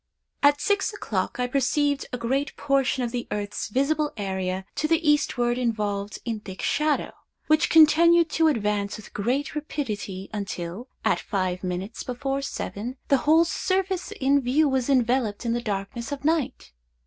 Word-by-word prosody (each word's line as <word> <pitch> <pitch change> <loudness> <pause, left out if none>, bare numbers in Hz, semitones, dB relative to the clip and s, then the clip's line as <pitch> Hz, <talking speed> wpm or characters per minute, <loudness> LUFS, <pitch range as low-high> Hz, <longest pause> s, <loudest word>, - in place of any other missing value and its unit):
"At 290 0 +5
six 405 +4 +1
o'clock, 215 - -3
I 250 - +2
perceived 275 +2 +1
a 250 - -2
great 265 +5 -1
portion 270 -2 +1
of 235 - -2
the 245 -1 -4
earth's 205 0 -3
visible 290 +6 +1
area 190 -2 -2
to 310 - +1
the 330 0 +1
eastward 245 -5 +2
involved 210 -4 -1
in 230 -3 -2
thick 190 -3 -8
shadow, 300 -1 +1 0.3
which 310 +1 +3
continued 330 +2 +6
to 320 +1 +3
advance 210 -7 0
with 215 - -13
great 260 +9 -1
rapidity, 210 -10 -4
until, 195 +1 -5 0.2
at - - +3
five 185 -3 -2
minutes 185 +4 -4
before 270 +2 -3
seven, 250 -2 -5
the 275 - +5
whole 325 +2 +6
surface 375 +1 -1
in 280 +1 +2
view 275 +5 +3
was 265 -1 0
enveloped 245 -4 +1
in 230 - +1
the 240 - -1
darkness 215 +3 -4
of 285 0 -5
night. 300 - 0
250 Hz, 160 wpm, -25 LUFS, 210-295 Hz, 0.3 s, continued